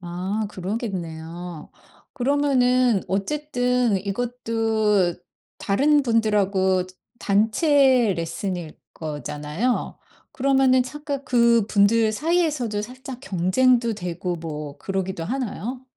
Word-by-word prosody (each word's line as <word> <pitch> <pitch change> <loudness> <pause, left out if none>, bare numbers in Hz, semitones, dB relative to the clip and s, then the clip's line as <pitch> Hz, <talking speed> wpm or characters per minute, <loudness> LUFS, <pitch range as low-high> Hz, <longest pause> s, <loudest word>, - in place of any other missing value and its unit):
아 185 +5 -3
그러겠네요. 175 -5 -6 0.4
그러면은 255 -4 +2
어쨌든 250 +1 0
이것도 220 -2 0 0.4
다른 285 +9 +3
분들하고 200 -6 +2 0.3
단체 240 - +3
레슨일 170 0 -4 0.2
거잖아요. 150 - -3 0.3
그러면은 265 -1 +3
잠깐 285 0 -5
그분들 230 -2 +3
사이에서도 295 -6 0
살짝 255 +3 -8
경쟁도 230 +6 +2
되고 180 -2 -4
뭐 150 -3 -7
그러기도 190 -3 -3
하나요? 245 +1 -4
220 Hz, 225 characters per minute, -23 LUFS, 185-255 Hz, 0.4 s, 다른